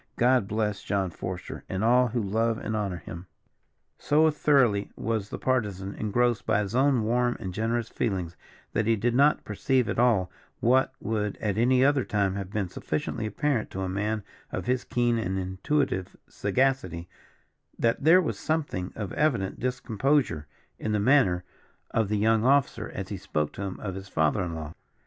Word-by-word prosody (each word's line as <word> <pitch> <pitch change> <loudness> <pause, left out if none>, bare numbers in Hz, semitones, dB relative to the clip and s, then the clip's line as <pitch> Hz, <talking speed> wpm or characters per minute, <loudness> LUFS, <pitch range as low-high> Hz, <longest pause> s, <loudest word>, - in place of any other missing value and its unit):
God 125 -3 +3
bless 105 -1 -1
John 95 -3 -1
Forester, 90 +2 -6
and 95 +2 -2
all 125 +2 +5
who 120 -1 -2
love 115 +3 0
and 110 - -3
honour 100 -4 -2
him." 85 +1 -9 0.7
So 155 +2 +4
thoroughly 130 -9 +3
was 110 -2 -2
the - - -5
Partisan 100 -7 -1
engrossed 120 +2 0
by 105 - +3
his 100 +1 -4
own 130 -2 +3
warm 120 +2 +1
and 95 -1 -5
generous 115 +3 -1
feelings, 90 -8 -2 0.4
that 110 - 0
he 115 - +4
did 115 +3 0
not 140 +4 +3
perceive 125 +4 +1
at - - -2
all, 105 -7 +3 0.3
what 130 +3 +3
would 105 -2 -2
at 105 -3 -1
any 125 +3 +4
other 140 -2 +3
time 100 -4 0
have 100 -1 -5
been 100 -2 -2
sufficiently 85 +6 -3
apparent 130 +2 -1
to 95 - -5
a - - -2
man 105 +3 -2 0.3
of - - -4
his 125 +1 0
keen 120 -1 +1
and 95 -4 -2
intuitive 95 +2 -1
sagacity, 130 -11 0 0.7
that 115 +3 +1
there 175 +4 +6
was - - -3
something 145 - -2
of 105 -4 -5
evident 120 -11 0
discomposure 125 - 0 0.3
in 110 - -2
the 105 - +2
manner 100 -7 +3 0.5
of 110 -3 +1
the 105 - +1
young 110 +1 +3
officer 140 +2 +2
as - - -6
he - - -4
spoke 75 -1 -2
to - - -7
him 95 -2 -4
of 100 -3 -4
his 95 +1 -8
father 80 +2 +1
in 85 -2 -4
law. 80 0 -6
110 Hz, 175 wpm, -27 LUFS, 95-125 Hz, 0.7 s, there